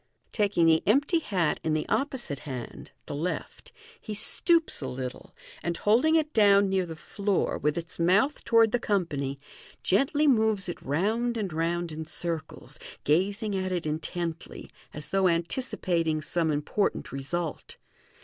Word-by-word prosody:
Taking 200 Hz, -6 st, +2 dB
the 160 Hz, -1 st, +5 dB
empty 285 Hz, -, +3 dB
hat 185 Hz, -, 0 dB
in 155 Hz, -1 st, +1 dB
the 155 Hz, -, -2 dB
opposite 265 Hz, -, -1 dB
hand 130 Hz, -5 st, -7 dB, 0.2 s
(the -, -, -6 dB
left), 165 Hz, +5 st, -4 dB, 0.3 s
he 215 Hz, -, -5 dB
stoops 335 Hz, -, +2 dB
a -, -, -3 dB
little, 125 Hz, 0 st, -6 dB, 0.3 s
and 170 Hz, 0 st, -2 dB
holding 250 Hz, +10 st, +3 dB
it 310 Hz, -1 st, +1 dB
down 200 Hz, -2 st, +5 dB
near 190 Hz, -2 st, 0 dB
the 165 Hz, -, -6 dB
floor, 200 Hz, +5 st, -1 dB
with 150 Hz, +1 st, 0 dB
its 170 Hz, 0 st, -5 dB
mouth 195 Hz, -, +2 dB
toward 230 Hz, -2 st, +4 dB
the 245 Hz, -, +1 dB
company, 145 Hz, -, -1 dB, 0.4 s
gently 275 Hz, +9 st, +2 dB
moves 220 Hz, -6 st, +3 dB
it 175 Hz, -, -5 dB
round 220 Hz, -, 0 dB
and 195 Hz, -6 st, -3 dB
round 170 Hz, +1 st, -1 dB
in 155 Hz, +1 st, -5 dB
circles, 165 Hz, 0 st, -5 dB, 0.2 s
gazing 200 Hz, +7 st, +1 dB
at 185 Hz, -1 st, -2 dB
it 175 Hz, -3 st, -2 dB
intently, 165 Hz, +2 st, -4 dB, 0.2 s
as 150 Hz, 0 st, -7 dB
though 195 Hz, -1 st, +3 dB
anticipating 170 Hz, -3 st, 0 dB
some 165 Hz, 0 st, 0 dB
important 150 Hz, +7 st, -1 dB
result. 155 Hz, +4 st, -4 dB
180 Hz, 150 wpm, -27 LUFS, 160-215 Hz, 0.4 s, the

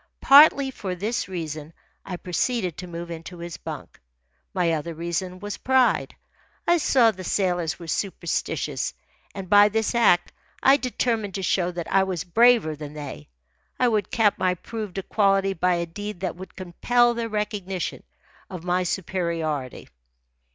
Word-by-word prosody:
Partly 280 Hz, -1 st, +7 dB
for 190 Hz, -7 st, -5 dB
this 215 Hz, +6 st, -2 dB
reason 160 Hz, -4 st, -6 dB, 0.3 s
I 180 Hz, -, -6 dB
proceeded 180 Hz, +1 st, -1 dB
to 180 Hz, -, -7 dB
move 170 Hz, 0 st, -7 dB
into 165 Hz, +2 st, -8 dB
his 170 Hz, 0 st, -7 dB
bunk. -, -, -8 dB, 0.5 s
My 175 Hz, -3 st, +1 dB
other 160 Hz, +1 st, -3 dB
reason 170 Hz, +3 st, -3 dB
was 205 Hz, +1 st, -5 dB
pride. 260 Hz, -1 st, +2 dB, 0.5 s
I 345 Hz, 0 st, +4 dB
saw 250 Hz, -6 st, +4 dB
the 185 Hz, -3 st, -9 dB
sailors 175 Hz, -4 st, 0 dB
were 170 Hz, -, -10 dB
superstitious, 170 Hz, -1 st, -2 dB, 0.4 s
and 195 Hz, -2 st, -6 dB
by 205 Hz, +2 st, +6 dB
this 220 Hz, +2 st, 0 dB
act 220 Hz, -7 st, +3 dB, 0.3 s
I 270 Hz, +1 st, +7 dB
determined 230 Hz, -6 st, -1 dB
to 195 Hz, -, -3 dB
show 180 Hz, -1 st, +1 dB
that 170 Hz, -1 st, -4 dB
I 195 Hz, -, +5 dB
was 185 Hz, -4 st, -3 dB
braver 220 Hz, -3 st, +4 dB
than 150 Hz, 0 st, -8 dB
they. 145 Hz, -, -8 dB, 0.5 s
I 250 Hz, -, +4 dB
would 210 Hz, -4 st, 0 dB
cap 215 Hz, -3 st, +2 dB
my 185 Hz, -1 st, +2 dB
proved 210 Hz, 0 st, -7 dB
equality 195 Hz, 0 st, +2 dB
by 180 Hz, 0 st, +1 dB
a 170 Hz, 0 st, -1 dB
deed 205 Hz, +2 st, -7 dB
that 185 Hz, -4 st, -2 dB
would 185 Hz, +1 st, -11 dB
compel 240 Hz, +7 st, +2 dB
their 230 Hz, -1 st, -3 dB
recognition 205 Hz, -4 st, -3 dB, 0.5 s
of 180 Hz, -3 st, -7 dB
my 180 Hz, +1 st, +1 dB
superiority. 170 Hz, -7 st, -3 dB
185 Hz, 155 wpm, -24 LUFS, 170-215 Hz, 0.5 s, Partly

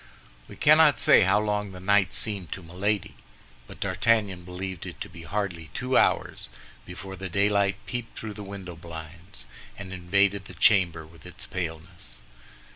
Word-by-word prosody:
We -, -, -11 dB
cannot 155 Hz, 0 st, +6 dB
say -, -, +7 dB
how 95 Hz, +1 st, +4 dB
long 105 Hz, -1 st, -1 dB
the 90 Hz, -, -9 dB
night 100 Hz, +1 st, +3 dB
seemed 100 Hz, -5 st, -2 dB
to 95 Hz, -, -9 dB
Milady, 95 Hz, +4 st, -2 dB, 0.5 s
but -, -, -12 dB
D'Artagnan 105 Hz, -6 st, +1 dB
believed 90 Hz, 0 st, -6 dB
it -, -, -9 dB
to -, -, -5 dB
be 85 Hz, -, -11 dB
hardly 85 Hz, -2 st, -3 dB
two 125 Hz, +1 st, -1 dB
hours -, -, +2 dB, 0.4 s
before 95 Hz, +2 st, -8 dB
the 95 Hz, -1 st, -6 dB
daylight 100 Hz, +1 st, +2 dB
peeped 120 Hz, -2 st, -5 dB
through 110 Hz, -1 st, -5 dB
the 105 Hz, -, -8 dB
window 100 Hz, -3 st, -8 dB
blinds, 80 Hz, -3 st, -10 dB, 0.3 s
and 95 Hz, -1 st, -7 dB
invaded 100 Hz, +2 st, +1 dB
the -, -, -11 dB
chamber 85 Hz, -6 st, +4 dB
with 80 Hz, +1 st, -17 dB
its -, -, -6 dB
paleness. 80 Hz, -3 st, -6 dB
95 Hz, 160 wpm, -27 LUFS, 85-105 Hz, 0.5 s, say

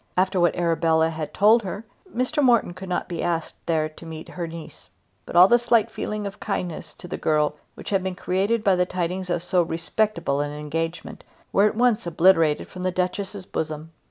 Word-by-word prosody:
After 185 Hz, 0 st, +2 dB
what 175 Hz, 0 st, +3 dB
Arabella 165 Hz, -2 st, +2 dB
had 155 Hz, -2 st, -5 dB
told 215 Hz, +7 st, +5 dB
her 205 Hz, +2 st, -6 dB, 0.3 s
Mr. 255 Hz, +2 st, 0 dB
Morton 240 Hz, -9 st, +3 dB
could 185 Hz, +1 st, -9 dB
not 180 Hz, -, -1 dB
be 170 Hz, -2 st, -4 dB
asked 165 Hz, -2 st, -1 dB
there 160 Hz, -2 st, +1 dB
to 155 Hz, +2 st, -15 dB
meet 160 Hz, 0 st, -8 dB
her 175 Hz, -2 st, -5 dB
niece. 165 Hz, -1 st, -10 dB, 0.4 s
But -, -, -7 dB
all 180 Hz, +2 st, +9 dB
the 240 Hz, +3 st, +5 dB
slight 235 Hz, -2 st, +2 dB
feeling 210 Hz, -1 st, -4 dB
of 200 Hz, 0 st, -6 dB
kindness 180 Hz, -5 st, -4 dB
to 180 Hz, -, -11 dB
the -, -, -4 dB
girl 150 Hz, -1 st, +2 dB, 0.2 s
which -, -, -8 dB
had 195 Hz, -1 st, +2 dB
been 190 Hz, 0 st, -3 dB
created 200 Hz, +5 st, 0 dB
by 195 Hz, -3 st, +4 dB
the 180 Hz, 0 st, +2 dB
tidings 180 Hz, +1 st, -3 dB
of 175 Hz, -1 st, -1 dB
so 180 Hz, 0 st, +2 dB
respectable 170 Hz, -2 st, -1 dB
an 145 Hz, -, -2 dB
engagement 165 Hz, +3 st, -4 dB, 0.3 s
were 200 Hz, +2 st, +5 dB
at 215 Hz, -, -2 dB
once 240 Hz, -6 st, +2 dB
obliterated 165 Hz, -3 st, +3 dB
from 185 Hz, -, -9 dB
the 185 Hz, -, +1 dB
Duchess's 185 Hz, +2 st, -3 dB
bosom. 155 Hz, -1 st, -4 dB
180 Hz, 200 wpm, -24 LUFS, 165-200 Hz, 0.4 s, all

